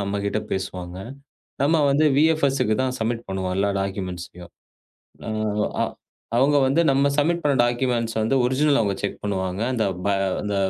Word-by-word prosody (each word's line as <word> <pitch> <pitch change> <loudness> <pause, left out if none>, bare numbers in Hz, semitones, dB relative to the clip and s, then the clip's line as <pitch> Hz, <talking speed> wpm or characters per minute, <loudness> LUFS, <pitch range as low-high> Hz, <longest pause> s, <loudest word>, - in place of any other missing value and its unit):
நம்மகிட்ட 100 +1 -2
பேசுவாங்க. 90 -1 -4 0.7
நாம 155 +2 +3
வந்து 150 +3 +3
வி.எஃப்.எஸ் 155 -3 +3
க்கு 110 - +1
தான் 130 -1 -1
சப்மிட் 115 +1 -2
பண்ணுவோம். 95 -1 -2
எல்லா 100 +1 +2
டாக்குமெண்ட்ஸ் 95 -3 -4 1.5
ஆ - - +3 0.5
அவங்க 145 +3 +4
வந்து 140 +6 +3
நம்ம 135 +1 +2
சப்மிட் 170 +3 +2
பண்ண 145 -2 +2
டாக்குமெண்ட்ஸ் 120 -1 0
ஒரிஜினல் 140 +2 +2
அவங்க 100 -2 0
செக் 100 - -4
பண்ணுவாங்க. 95 -1 -2
அந்த 110 -3 0 0.2
ப் - - +2 0.3
அந்த 105 -1 -2
115 Hz, 140 wpm, -23 LUFS, 100-140 Hz, 1.5 s, அவங்க